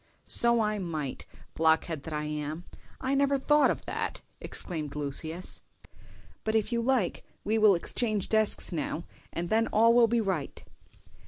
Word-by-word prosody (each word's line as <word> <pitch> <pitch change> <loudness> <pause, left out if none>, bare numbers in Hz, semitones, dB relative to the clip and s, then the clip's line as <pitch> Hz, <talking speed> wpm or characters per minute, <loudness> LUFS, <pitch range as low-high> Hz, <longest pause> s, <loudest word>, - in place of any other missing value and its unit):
"So 235 0 +5
I 210 -1 -1
might, 155 -7 -5 0.3
blockhead 160 -1 +1
that 160 - -6
I 150 0 -2
am; 150 +2 -5 0.3
I 265 +1 -1
never 280 0 +2
thought 295 +2 +3
of - - -3
that!" - - -4 0.2
exclaimed 155 -5 -4
Lucius. 155 +4 -2 0.8
"But 220 0 -1
if 220 +2 +1
you 235 0 0
like 240 -6 0 0.2
we 220 +2 0
will 210 -3 +6
exchange 215 +3 -1
desks 220 -2 +2
now, 160 0 -3 0.3
and 170 0 -4
then 225 +1 +3
all 230 +2 +4
will 235 -1 +5
be 235 +1 +1
right. 190 -9 -3
200 Hz, 155 wpm, -28 LUFS, 160-230 Hz, 0.8 s, will